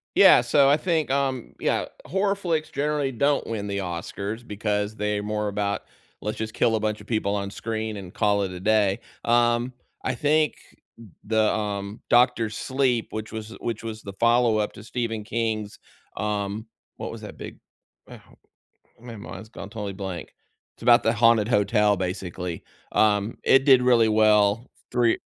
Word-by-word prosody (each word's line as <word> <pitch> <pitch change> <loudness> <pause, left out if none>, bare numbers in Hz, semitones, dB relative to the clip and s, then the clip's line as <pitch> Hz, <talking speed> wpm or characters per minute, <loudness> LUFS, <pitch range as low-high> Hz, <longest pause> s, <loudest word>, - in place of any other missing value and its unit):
Yeah, - - +8
so 140 -2 +4
I 145 - +5
think, 160 -3 0
um, 135 -3 -1
yeah, - - 0 0.2
horror 195 +2 +1
flicks 165 -6 -2
generally 145 -1 -1
don't 140 +4 +1
win 105 -3 -3
the 100 0 -2
Oscars 100 +5 -5
because 105 0 -2
they're 105 0 -1
more 105 0 -2
about, 100 -1 -2 0.4
"Let's 105 +1 -4
just 110 0 -4
kill 115 -2 +2
a - - -2
bunch 105 0 -1
of - - -13
people 110 -3 0
on 100 -1 -2
screen 110 0 -4
and 95 -2 -8
call 100 -1 +2
it 95 - -2
a 90 - -7
day." 105 0 +2 0.2
Um, 120 +1 +2 0.3
I 130 - 0
think 150 +3 +2 0.4
th 115 -2 -13 0.2
the, 110 0 +2
um 100 0 -3
Doctor 120 -2 +4
Sleep, 130 +1 0
which 110 0 -5
was 110 -1 -6
which 115 -1 -4
was 110 -1 -6
the 100 - -7
follow-up 115 -1 +2
to - - -12
Stephen 115 -2 -3
King's, 110 -2 -2 0.4
um 105 +1 -2 0.3
what - - -5
was - - -8
that - - -9
big - - -9 0.5
ah, - - -9
how - - -22 0.6
my 120 0 -9
mind's 105 -1 -9
gone 100 - -9
totally 105 -2 -5
blank. 95 -3 -6 0.4
It's - - -15
about 120 0 +6
the 115 - +2
haunted 115 -2 +4
hotel 105 -2 +3
basically. 90 -2 -4 0.3
Um, 105 0 +2
it 135 0 +5
did 130 -3 +7
really 120 -3 +4
well, 105 +1 +3 0.2
3 120 -2 +3
110 Hz, 170 wpm, -25 LUFS, 105-120 Hz, 0.6 s, Yeah